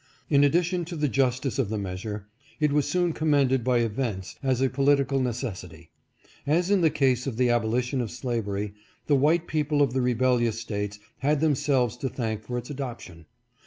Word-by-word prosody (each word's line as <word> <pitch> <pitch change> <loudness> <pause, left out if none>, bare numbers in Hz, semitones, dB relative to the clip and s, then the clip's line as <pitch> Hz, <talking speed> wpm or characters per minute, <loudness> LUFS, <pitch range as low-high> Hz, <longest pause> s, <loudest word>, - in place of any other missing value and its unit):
In 140 -1 +5
addition 175 +4 +2
to 170 +1 -6
the 150 -2 0
justice 130 0 0
of 120 -7 +1
the 110 - -2
measure, 100 +1 -5 0.3
it 150 -1 +2
was 150 -1 +1
soon 175 -2 +1
commended 140 -5 +2
by 125 0 +2
events, 110 -4 -3
as 130 -3 +1
a 135 - +3
political 140 0 +2
necessity. 120 -5 -4 0.6
As 175 +6 +2
in 200 -3 +4
the 160 - +5
case 130 -3 +1
of 120 -5 -3
the 125 -1 +3
abolition 120 +3 0
of 115 - -3
slavery, 105 -5 -3 0.3
the 150 - +1
white 160 +5 +3
people 150 -2 0
of 140 -4 +3
the 130 - +1
rebellious 120 -2 +1
States 105 -2 -4 0.2
have 145 +2 +1
themselves 135 -5 +1
to 135 - -2
thank 110 -4 -3
for 125 +2 -5
its 120 +3 -6
adoption. 120 - -7
130 Hz, 180 wpm, -26 LUFS, 115-145 Hz, 0.6 s, In